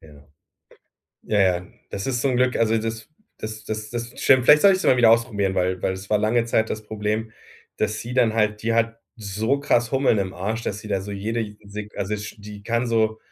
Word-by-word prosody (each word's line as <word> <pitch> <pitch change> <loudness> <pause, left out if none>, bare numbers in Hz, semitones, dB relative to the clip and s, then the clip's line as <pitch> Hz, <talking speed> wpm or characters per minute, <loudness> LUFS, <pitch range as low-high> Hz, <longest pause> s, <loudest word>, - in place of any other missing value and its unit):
Ja. 75 -2 -17 1.0
Ja, 105 - 0
ja. 90 -2 +2 0.2
Das 100 +3 -4
ist 125 -3 -1
so 140 - +2
'n 125 - +1
Glück, 125 0 +2
also 115 0 +2
das 110 0 -5 0.3
das 110 -1 -6 0.3
das 120 0 -5
stimmt. 130 -2 +5
Vielleicht 150 +3 +7
sollte 195 -2 +7
ich's 190 - -5
mal 130 - +5
wieder 115 -2 +6
ausprobieren, 105 -5 +2
weil 90 0 0
weil 95 - +1
es 95 +1 -8
war 105 - +4
lange 115 +3 +2
Zeit 110 -1 +1
das 110 - -3
Problem, 110 +1 -3 0.4
dass 110 0 -1
sie 120 +2 -6
dann 120 -4 +3
halt 105 -1 0
die 115 0 0
hat 115 0 0 0.2
so 110 +5 -1
krass 120 -4 +1
Hummeln 135 -5 +2
im 95 -1 -2
Arsch, 110 +6 -3
dass 105 -2 -3
sie 105 0 -10
da 100 -2 0
so 100 +2 -7
jede 105 +1 -3
Sek 105 +1 -8
also 105 +2 -2
sch 105 +1 -8
die 105 0 -10
kann 115 +2 0
so 110 -1 +1
110 Hz, 220 wpm, -23 LUFS, 105-115 Hz, 1.0 s, Vielleicht